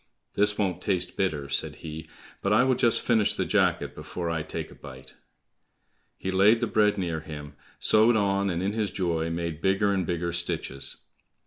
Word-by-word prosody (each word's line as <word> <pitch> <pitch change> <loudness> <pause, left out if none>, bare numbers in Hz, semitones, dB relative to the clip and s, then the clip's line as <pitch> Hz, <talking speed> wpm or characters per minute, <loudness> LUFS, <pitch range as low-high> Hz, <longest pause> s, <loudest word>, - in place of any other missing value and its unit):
"This 105 0 +2
won't 95 -4 -1
taste 90 -3 -1
bitter," 75 -7 -1
said 70 - -2
he, 80 0 -8 0.3
"but 100 - 0
I 110 +4 +5
will 130 0 +3
just 120 -2 +5
finish 110 -4 +2
the - - -1
jacket - - +1
before 85 -2 -5
I 80 -1 -1
take 75 - -6
a - - -11
bite." 65 -1 -12 1.0
He 95 - -3
laid 100 +5 +5
the 120 - 0
bread 105 -2 +2
near 85 -4 -2
him, 75 -2 -9 0.3
sewed 110 +2 +5
on, 100 -1 +1
and 90 0 -2
in 100 +2 -1
his 110 -2 -1
joy, 80 -3 -1
made 85 -1 -4
bigger 100 +1 +2
and 95 -2 0
bigger 85 0 -2
stitches. 70 -5 -1
90 Hz, 185 wpm, -26 LUFS, 80-105 Hz, 1.0 s, I